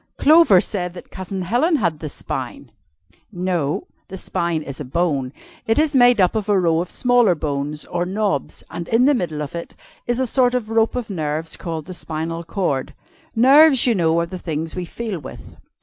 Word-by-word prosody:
"Clover 305 Hz, -, +6 dB
said 180 Hz, -3 st, -2 dB
that 180 Hz, -, -12 dB
Cousin 190 Hz, 0 st, -5 dB
Helen 250 Hz, -, +2 dB
had 170 Hz, -, 0 dB
the 155 Hz, -, -5 dB
spine!" 130 Hz, -2 st, -6 dB, 0.6 s
"No 175 Hz, -6 st, -2 dB, 0.2 s
the 190 Hz, -, -8 dB
spine 170 Hz, -3 st, -2 dB
is 140 Hz, -2 st, -7 dB
a -, -, -3 dB
bone. 140 Hz, -2 st, -1 dB, 0.4 s
It 225 Hz, -, +2 dB
is 305 Hz, -1 st, +2 dB
made 245 Hz, -3 st, +6 dB
up 185 Hz, -2 st, +4 dB
of 215 Hz, -1 st, -2 dB
a 200 Hz, -2 st, +4 dB
row 165 Hz, -2 st, +2 dB
of 180 Hz, -, -5 dB
smaller 245 Hz, -7 st, +3 dB
bones 150 Hz, 0 st, -3 dB
or 175 Hz, 0 st, -2 dB
knobs 190 Hz, -, -2 dB
and 170 Hz, 0 st, -6 dB
in 230 Hz, +3 st, +3 dB
the 290 Hz, -, +5 dB
middle 160 Hz, -, -2 dB
of 140 Hz, -, -8 dB
it 170 Hz, 0 st, -7 dB, 0.3 s
is 240 Hz, +1 st, 0 dB
a 260 Hz, -, +1 dB
sort 250 Hz, 0 st, +2 dB
of 225 Hz, -3 st, -3 dB
rope 225 Hz, +1 st, +2 dB
of 240 Hz, -4 st, -4 dB
nerves 155 Hz, -2 st, -3 dB
called 160 Hz, -3 st, -5 dB
the 185 Hz, -, -8 dB
spinal 165 Hz, 0 st, -4 dB
cord. 160 Hz, -7 st, -2 dB, 0.4 s
Nerves, 270 Hz, +3 st, +6 dB
you 245 Hz, -, +3 dB
know, 165 Hz, -4 st, +2 dB
are 170 Hz, -, 0 dB
the 180 Hz, +2 st, -8 dB
things 160 Hz, -1 st, -4 dB
we 180 Hz, -1 st, -3 dB
feel 215 Hz, 0 st, -5 dB
with. 135 Hz, -, -11 dB
180 Hz, 195 wpm, -21 LUFS, 160-225 Hz, 0.6 s, Clover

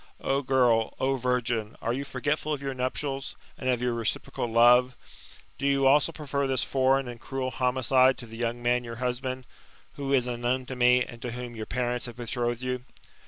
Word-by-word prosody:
O 135 Hz, +1 st, 0 dB
girl, 125 Hz, -4 st, +2 dB
O 135 Hz, +1 st, +1 dB
virgin, 120 Hz, -3 st, -1 dB
are 115 Hz, -, -1 dB
you 135 Hz, +3 st, -2 dB
forgetful 145 Hz, +3 st, -2 dB
of 145 Hz, -2 st, -2 dB
your 135 Hz, -1 st, -2 dB
nuptials, 135 Hz, +2 st, -3 dB, 0.2 s
and 130 Hz, -, -3 dB
of 125 Hz, -1 st, +1 dB
your 125 Hz, -1 st, +1 dB
reciprocal 115 Hz, +1 st, -2 dB
love? 120 Hz, +2 st, +5 dB, 0.6 s
Do 140 Hz, -, 0 dB
you 140 Hz, -1 st, +2 dB
also 145 Hz, +4 st, +5 dB
prefer 140 Hz, -3 st, -2 dB
this 130 Hz, -2 st, +1 dB
foreign 135 Hz, 0 st, +2 dB
and 120 Hz, -1 st, -8 dB
cruel 130 Hz, -1 st, -3 dB
homicide 130 Hz, +1 st, +3 dB
to 120 Hz, -, -9 dB
the 115 Hz, -1 st, -11 dB
young 120 Hz, 0 st, -2 dB
man 120 Hz, +1 st, +2 dB
your 115 Hz, -1 st, -7 dB
husband, 130 Hz, +1 st, -3 dB, 0.5 s
who 140 Hz, -1 st, -3 dB
is 130 Hz, -3 st, +3 dB
unknown 125 Hz, +1 st, -1 dB
to 130 Hz, -, -6 dB
me, 125 Hz, 0 st, +5 dB
and 120 Hz, -1 st, -11 dB
to 120 Hz, -2 st, -4 dB
whom 120 Hz, -1 st, -6 dB
your 110 Hz, -1 st, -6 dB
parents 125 Hz, 0 st, -1 dB
have 120 Hz, 0 st, -9 dB
be 120 Hz, -, -5 dB
trothed 120 Hz, +1 st, -2 dB
you? 125 Hz, -1 st, -2 dB
125 Hz, 200 wpm, -27 LUFS, 120-135 Hz, 0.6 s, love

